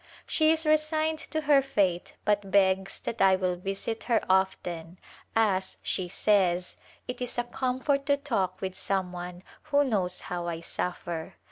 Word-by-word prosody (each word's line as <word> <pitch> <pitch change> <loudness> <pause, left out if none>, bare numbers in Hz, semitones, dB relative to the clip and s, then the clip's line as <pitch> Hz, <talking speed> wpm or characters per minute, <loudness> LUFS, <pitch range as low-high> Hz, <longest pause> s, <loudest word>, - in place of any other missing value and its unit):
She 315 -1 +3
is 320 0 +1
resigned 310 +1 +2
to 315 - -1
her 290 -2 +5
fate 195 -9 0
but 205 -1 +1
begs 190 -1 +2
that 230 - -4
I 190 -1 +6
will 185 -1 0
visit 195 +5 -4
her 235 -2 +3
often, 180 -3 0 0.2
" - - -27
as," 195 -4 +1
she 185 -2 -1
says, 180 -3 +2 0.2
" - - -29
it 250 - -5
is 245 -1 -2
a 240 - +2
comfort 260 +3 -1
to 285 -1 +4
talk 200 -10 -1
with 190 -1 -3
some 190 -1 -1
one 180 0 -7 0.2
who 290 -1 +3
knows 190 -8 -1
how 175 -1 -4
I 165 -1 -3
suffer." 170 -1 -4
195 Hz, 170 wpm, -28 LUFS, 180-265 Hz, 0.2 s, I